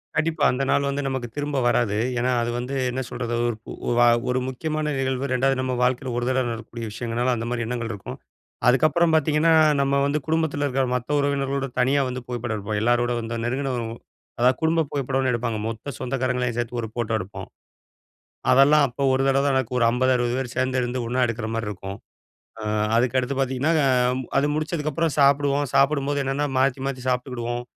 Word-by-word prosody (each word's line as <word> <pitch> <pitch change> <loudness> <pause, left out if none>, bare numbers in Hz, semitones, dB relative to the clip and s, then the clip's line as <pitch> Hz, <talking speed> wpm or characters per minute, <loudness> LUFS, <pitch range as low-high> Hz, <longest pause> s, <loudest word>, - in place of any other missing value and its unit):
கண்டிப்பா. 155 -2 0
அந்த 130 +2 -1
நாள் 140 0 +2
வந்து 140 +1 -2
நமக்கு 130 -2 -3
திரும்ப 145 -1 -2
வராது. 110 -4 +1 0.2
ஏன்னா, 125 +1 +1
அது 115 - -1
வந்து 125 +3 -4 0.2
என்ன 130 +1 -2
சொல்றது 120 -1 -3 0.5
ஒ - - +1
வ - - +5 0.3
ஒரு 125 - +1
முக்கியமான 155 +3 -2
நிகழ்வு. 130 0 -1
2வது 135 +1 +2
நம்ப 130 0 -1
வாழ்க்கையில 125 +1 0
ஒரு 120 - -1
தடவை 130 -1 +1
நடக்கக்கூடிய 115 0 -6
விஷயங்கள்னால 120 +3 -1
அந்தமாதிரி 115 +1 -3
எண்ணங்கள் 115 -1 -3
இருக்கும். 100 -3 -7 0.5
அதுக்கப்புறம் 155 +6 +4
பாத்தீங்கன்னா, 155 +1 +3 0.3
நம்ம 140 0 +2
வந்து 145 +2 0
குடும்பத்தில 160 -2 0
இருக்கிற 135 -1 0
மத்த 125 +4 -1
உறவினர்களோடு 140 -1 0
தனியா 135 +3 +3
வந்து 125 0 -5
புகைப்படம் 120 -2 -3
எடுப்போம். 105 +1 -3
எல்லோரோட 120 +1 +2
வந்து 115 0 -4
நெருங்கின 135 +2 -1 0.7
அதாவது 125 +1 +4
குடும்ப 160 0 +2
புகைப்படம்னு 135 -2 0
எடுப்பாங்க. 120 -2 -1
மொத்த 115 +5 -5
சொந்தக்காரங்களையும் 125 -2 -1
சேர்த்து 120 0 -2
ஒரு 110 - -4
ஃபோட்டோ 120 -2 -2
எடுப்போம். 95 +2 -7 1.0
அதெல்லாம் 145 +2 +6
அப்போ 125 +3 -6
ஒரு 130 +1 +2
தடவ 135 0 +3
தான் 135 - +2
நடக்கும். 125 -1 -1
ஒரு 115 - +4
50, 130 +2 +2
60 120 -1 0
பேர் 125 -3 -4
சேர்ந்து 130 0 0
இருந்து 125 +1 -2
ஒண்ணா 125 +2 0
எடுக்கிற 115 -1 -3
மாரி 115 -2 -2
இருக்கும். 100 -1 -6 0.7
அ - - -6 0.3
அதுக்கடுத்து 125 +2 +1
பாத்தீங்கன்னா, 135 +4 +1
அ - - +4 0.5
அது 140 +2 +3
முடிச்சதுக்கப்புறம் 155 0 -1
சாப்பிடுவோம், 140 +1 +3
சாப்பிடும்போது 140 0 +2
என்னன்னா 140 +2 0
மாத்தி, 130 0 +1
மாத்தி 130 -2 -4
சாப்பிட்டுக்கிடுவோம். 120 -1 -2
130 Hz, 175 wpm, -24 LUFS, 120-140 Hz, 1.0 s, அதெல்லாம்